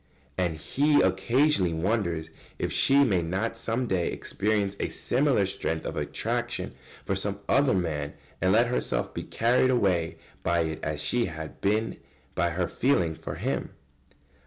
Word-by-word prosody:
And 90 -4 0
he 145 - +2
occasionally 95 - +2
wonders 85 -3 -1 0.3
if - - -2
she 140 +1 +5
may 100 -9 +2
not 95 +8 -2
some 115 +2 -1
day 95 -6 0
experience 100 -1 -1
a - - -1
similar 125 -5 +2
strength 80 -4 -3
of - - -4
attraction - - -2 0.3
for 95 - 0
some 100 +1 -1
other 140 -4 +4
man 75 -5 -2 0.3
and 95 +2 +3
let 115 +4 +5
herself 90 - -1
be - - -3
carried 125 +3 +2
away 95 -9 +1 0.2
by 85 0 +2
it 80 -1 -2
as 75 0 -3
she 120 +8 +1
had 80 -2 -7
been 110 +3 +1 0.4
by 85 -2 +1
her 85 +1 -1
feeling 90 -6 +1
for - - -7
him. - - -3
95 Hz, 155 wpm, -27 LUFS, 85-115 Hz, 0.4 s, she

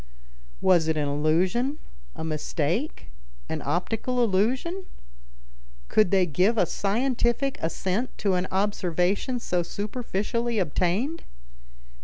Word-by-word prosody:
Was 175 -4 +4
it 160 -1 +1
an 145 -1 0
illusion, 180 - +1 0.4
a - - -5
mistake, 160 - -2 0.4
an - - -3
optical 225 - 0
illusion? 255 - 0 1.0
Could 215 -4 +4
they 190 -1 +4
give 185 +8 +2
a 185 - +4
scientific 240 - 0
assent 190 +8 -2
to 200 -2 +1
an 180 0 0
observation 195 - 0
so 180 -6 0
superficially 225 +4 -2
obtained? 190 - 0
195 Hz, 105 wpm, -26 LUFS, 175-240 Hz, 1.0 s, Was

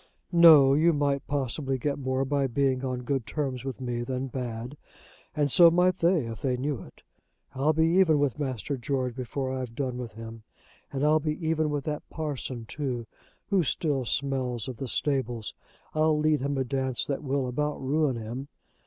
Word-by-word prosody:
"No. 160 -6 +8
You 165 +4 +4
might 140 -1 0
possibly 135 -1 -1
get 140 +3 -2
more 130 0 0
by 140 0 +1
being 130 0 0
on 125 -1 -3
good 130 -3 -2
terms 135 -4 -3
with 135 -1 -5
me 120 -2 -3
than 130 +2 -3
bad. 120 0 -5 0.6
And 145 -2 +1
so 170 +3 +8
might 180 +2 +3
they 170 -5 +3
if 115 0 -7
they 130 -2 0
knew 135 0 -2
it. - - -15 0.5
I'll 135 +3 +2
be 160 +1 +3
even 165 -2 +4
with 145 -1 0
Master 135 -1 -2
George 130 -1 -2
before 130 +1 -3
I've 130 -3 -4
done 130 -2 -2
with 120 -2 -6
him; 115 0 -9 0.5
and 140 +1 -1
I'll 155 +1 +4
be 155 0 -2
even 160 -1 +1
with 145 -1 -2
that 150 0 -4
parson, 135 -6 -4
too, 125 -2 -4 0.5
who 195 -2 +4
still 145 -3 0
smells 125 -3 -1
of 130 -3 -6
the 135 - -4
stables. 120 -3 -1 0.4
I'll 155 0 +3
lead 150 -1 +2
him 140 +1 -1
a 135 - +1
dance 130 -1 -1
that 140 - -2
will 135 -1 -1
about 150 +4 -2
ruin 140 0 +1
him. 115 +4 -6
135 Hz, 185 wpm, -27 LUFS, 125-150 Hz, 0.6 s, No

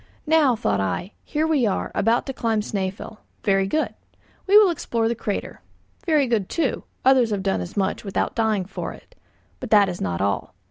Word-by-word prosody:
Now, 300 -5 +4
thought 105 - 0
I, 95 - -2
here 310 +1 -1
we 295 -7 +2
are, 195 - -2
about 230 +4 +2
to 270 - -4
climb 225 -4 0
Snæfell. 195 +1 -4 0.3
Very 195 -2 +2
good. 310 +10 -1 0.5
We 400 +2 +7
will 415 -4 +7
explore 230 -8 -1
the 230 - +1
crater. 215 -3 -4 0.5
Very 305 -4 +4
good, 225 -6 0
too, 315 -6 -1 0.2
others 260 -3 +5
have 200 -3 -2
done 195 - 0
as 90 - -8
much 195 0 -1
without 195 -2 -2
dying 220 -4 0
for 195 - -6
it. - - -17 0.5
But 255 - -6
that 205 -3 +5
is 175 - -6
not 90 -2 -2
all. 100 -2 -1
220 Hz, 190 wpm, -23 LUFS, 195-265 Hz, 0.5 s, We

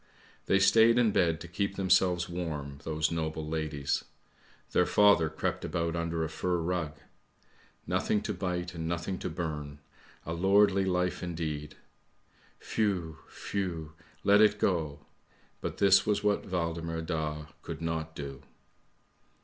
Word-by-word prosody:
They 95 - +4
stayed 110 +5 +6
in 120 -3 +4
bed 85 -4 +2
to 85 - -7
keep 100 +3 -2
themselves 90 -2 +3
warm, 75 -5 -5
those 80 0 -1
noble 80 -1 -2
ladies. 75 -3 -1 0.7
Their - - +3
father 100 -6 +5
crept 80 - -3
about 85 0 -1
under 85 -1 -1
a - - -1
fur 90 +3 -1
rug. 85 -3 -2 0.9
Nothing 105 - +1
to 105 - -2
bite, 90 -1 -3
and 80 -1 -4
nothing 85 +2 -2
to - - -3
burn; 75 -3 -4 0.5
a 80 - -3
lordly 95 +2 +4
life 90 -1 0
indeed! 80 -4 -4 1.0
Whew! 90 -8 0
whew! 85 -6 -4 0.3
let 100 +1 +6
it 105 -1 +5
go! 75 -8 -1 0.6
But - - -4
this 95 -1 +6
was 105 -1 0
what 105 -1 +1
Waldemar 85 -2 -2
Daa 75 -2 -3
could 80 -2 -6
not 80 -1 -3
do. 70 -2 -6
85 Hz, 135 wpm, -30 LUFS, 80-95 Hz, 1.0 s, stayed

